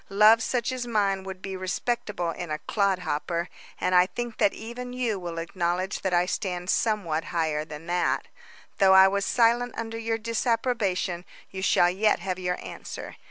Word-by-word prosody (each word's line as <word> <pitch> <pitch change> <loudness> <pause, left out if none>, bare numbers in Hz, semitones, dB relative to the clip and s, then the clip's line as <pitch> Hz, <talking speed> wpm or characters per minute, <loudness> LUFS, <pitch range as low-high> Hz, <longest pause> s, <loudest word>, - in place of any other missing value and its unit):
Love 215 +3 +6
such 245 +1 -1
as 250 -1 -4
mine 200 -4 +1
would 190 -1 -8
be 195 -1 -4
respectable 185 -1 -2
in 175 0 -6
a 155 - -1
clod 200 +2 +1
hopper, 170 0 -2 0.3
and 180 - 0
I 180 0 +6
think 240 +2 -5
that 200 - +4
even 245 +2 -7
you 240 -5 -1
will 170 -2 -6
acknowledge 175 +3 -2
that 190 - -1
I 175 0 +3
stand 180 -1 -2
somewhat 180 -8 0
higher 160 -3 -1
than 155 0 -9
that. 175 0 0 0.5
Though 190 -2 +6
I 190 0 +9
was 200 0 0
silent 240 0 +2
under 225 0 -4
your 225 0 -1
disapprobation, 225 -6 0 0.3
you 190 - -5
shall 175 -2 +4
yet 210 +3 +2
have 185 +1 -4
your 180 -1 -1
answer. - - -8
190 Hz, 175 wpm, -26 LUFS, 180-225 Hz, 0.5 s, I